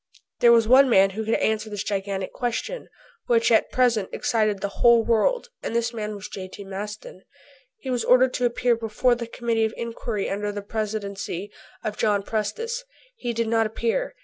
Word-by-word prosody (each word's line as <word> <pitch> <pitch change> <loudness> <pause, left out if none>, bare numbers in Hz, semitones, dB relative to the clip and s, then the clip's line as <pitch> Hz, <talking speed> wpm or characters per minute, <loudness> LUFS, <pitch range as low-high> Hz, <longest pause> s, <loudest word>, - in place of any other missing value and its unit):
There 235 - +6
was 230 -2 +5
one 260 +2 +7
man 195 -3 +5
who 220 +3 -4
could 220 +1 +1
answer 220 0 0
this 205 -2 -4
gigantic 195 -1 -3
question, 245 - -3 0.4
which 230 -1 +3
at 225 - +3
present 235 -6 +2
excited 215 -5 0
the 200 +1 -5
whole 235 -1 +6
world 355 - +1
and 230 - -4
this 235 0 0
man 215 -2 -4
was 200 0 -7
J.T. 190 +1 -8
Maston. 200 0 -7 0.6
He 265 -11 -5
was 245 -2 0
ordered 255 0 +4
to 250 - 0
appear 240 0 +2
before 230 +2 +1
the 235 -1 -4
Committee 230 -1 0
of 220 - -4
Inquiry 230 -3 -3
under 205 +1 -2
the 205 0 -6
Presidency 205 -2 -4 0.3
of 215 -2 -3
John 205 -2 +1
Prestice. 460 - -3 0.3
He 245 - -3
did 230 0 -1
not 225 0 +2
appear. - - -2
225 Hz, 180 wpm, -24 LUFS, 205-240 Hz, 0.6 s, one